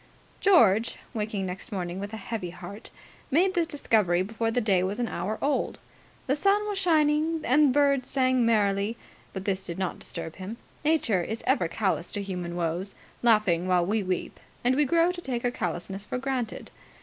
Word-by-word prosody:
George, 230 Hz, -, +4 dB, 0.2 s
waking 210 Hz, -3 st, -2 dB
next 185 Hz, +3 st, -6 dB
morning 180 Hz, -2 st, -3 dB
with 200 Hz, +1 st, -5 dB
a 220 Hz, -, -5 dB
heavy 210 Hz, -3 st, -4 dB
heart, 185 Hz, +5 st, -9 dB, 0.4 s
made 355 Hz, +7 st, +3 dB
this 340 Hz, -3 st, +1 dB
discovery 210 Hz, -, +2 dB
before 225 Hz, +3 st, -2 dB
the 235 Hz, +2 st, +1 dB
day 200 Hz, -6 st, +2 dB
was 190 Hz, +2 st, -1 dB
an 240 Hz, -, 0 dB
hour 205 Hz, +4 st, -3 dB
old. 285 Hz, +1 st, 0 dB, 0.5 s
The 275 Hz, -, +1 dB
sun 400 Hz, +6 st, +2 dB
was 410 Hz, -2 st, -1 dB
shining, 315 Hz, -2 st, +2 dB
and 285 Hz, +2 st, +4 dB
birds 280 Hz, -1 st, +2 dB
sang 255 Hz, -2 st, +2 dB
merrily, 210 Hz, -1 st, +2 dB, 0.3 s
but 190 Hz, 0 st, -6 dB
this 190 Hz, -1 st, -1 dB
did 170 Hz, -, -6 dB
not 190 Hz, -2 st, -2 dB
disturb 165 Hz, -1 st, -7 dB
him. 195 Hz, +5 st, -6 dB, 0.3 s
Nature 295 Hz, -, +2 dB
is 220 Hz, +6 st, -4 dB
ever 260 Hz, -, +2 dB
callous 170 Hz, -3 st, -1 dB
to 205 Hz, -, -2 dB
human 180 Hz, -3 st, -4 dB
woes, 175 Hz, +3 st, -2 dB, 0.3 s
laughing 210 Hz, -7 st, +3 dB
while 180 Hz, -2 st, +3 dB
we 210 Hz, +4 st, +1 dB
weep; 185 Hz, -2 st, -3 dB, 0.2 s
and 250 Hz, +1 st, +3 dB
we 295 Hz, +1 st, +3 dB
grow 335 Hz, +4 st, +3 dB
to 360 Hz, -1 st, -7 dB
take 250 Hz, -6 st, -3 dB
her 245 Hz, -, +1 dB
callousness 190 Hz, 0 st, -4 dB
for 230 Hz, -, -4 dB
granted. 255 Hz, -3 st, -3 dB
220 Hz, 185 wpm, -27 LUFS, 185-270 Hz, 0.5 s, George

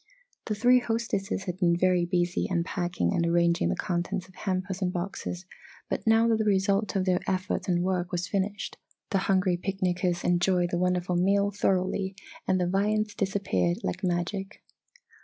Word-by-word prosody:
The 215 Hz, -, -2 dB
three 245 Hz, +4 st, +5 dB
hostesses 225 Hz, -5 st, -2 dB
had 180 Hz, -1 st, -5 dB
been 170 Hz, -2 st, +3 dB
very 180 Hz, -1 st, +3 dB
busy 175 Hz, 0 st, 0 dB
unpacking 175 Hz, -, -1 dB
and -, -, +1 dB
arranging 170 Hz, -, +2 dB
the 85 Hz, -, 0 dB
contents 180 Hz, -, -2 dB
of 185 Hz, -, -19 dB
hampers 190 Hz, 0 st, -3 dB
and 180 Hz, -1 st, +1 dB
boxes 180 Hz, 0 st, -4 dB, 0.5 s
but -, -, -2 dB
now 225 Hz, +1 st, +5 dB
that 225 Hz, -1 st, +3 dB
the -, -, +2 dB
result 200 Hz, +1 st, +1 dB
of 190 Hz, -1 st, +1 dB
their 180 Hz, -1 st, +2 dB
efforts 185 Hz, 0 st, -1 dB
and 175 Hz, -1 st, +1 dB
work 180 Hz, -1 st, -1 dB
was 175 Hz, 0 st, -2 dB
finished 200 Hz, +1 st, -2 dB, 0.3 s
the 195 Hz, -, +2 dB
hungry 185 Hz, -2 st, +3 dB
picnicers 180 Hz, -1 st, -1 dB
enjoyed 175 Hz, 0 st, +2 dB
the 175 Hz, -, 0 dB
wonderful 180 Hz, 0 st, +1 dB
meal 200 Hz, +3 st, +2 dB
thoroughly 190 Hz, 0 st, 0 dB, 0.3 s
and 185 Hz, -, +2 dB
the 180 Hz, -, +1 dB
viands 205 Hz, +3 st, +1 dB
disappeared 190 Hz, -, 0 dB
like 90 Hz, -, -3 dB
magic. 185 Hz, +2 st, -2 dB
185 Hz, 165 wpm, -27 LUFS, 175-195 Hz, 0.5 s, three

